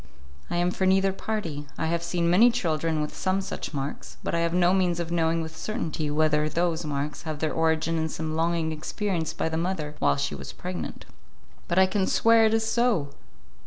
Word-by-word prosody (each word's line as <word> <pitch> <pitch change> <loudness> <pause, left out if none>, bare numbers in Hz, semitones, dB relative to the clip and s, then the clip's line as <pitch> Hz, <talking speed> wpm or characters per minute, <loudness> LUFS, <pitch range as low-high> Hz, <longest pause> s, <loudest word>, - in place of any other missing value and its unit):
"I - - -2
am 175 +1 +2
for 190 +1 0
neither 190 0 +3
party; 170 -9 -4
I - - -1
have 170 +1 0
seen 170 0 0
many 195 +8 +6
children 165 -8 0
with 150 - -6
some 185 +1 0
such 195 - -5
marks, 140 -1 -5
but - - -2
I 170 - +2
have 170 0 +1
no 180 +1 +3
means 180 -3 +2
of 170 -1 -3
knowing 165 -1 +1
with 160 0 -8
certainty 160 -6 -3
whether 150 0 +2
those 170 0 0
marks 150 0 -3
have 155 -2 -4
their 155 +1 -1
origin 160 0 +1
in 160 0 -1
some 155 0 -4
longing 165 0 0
experienced 160 +1 -3
by - - 0
the 160 0 -2
mother 165 -3 -2
while 70 - +3
she 70 +1 -1
was 70 -1 -7
pregnant." - - -6 0.6
"But 170 - -1
I 190 - +7
can 190 0 0
swear 230 0 +5
it 220 - +3
is 225 0 +1
so." 220 - +1
165 Hz, 205 wpm, -26 LUFS, 155-185 Hz, 0.6 s, I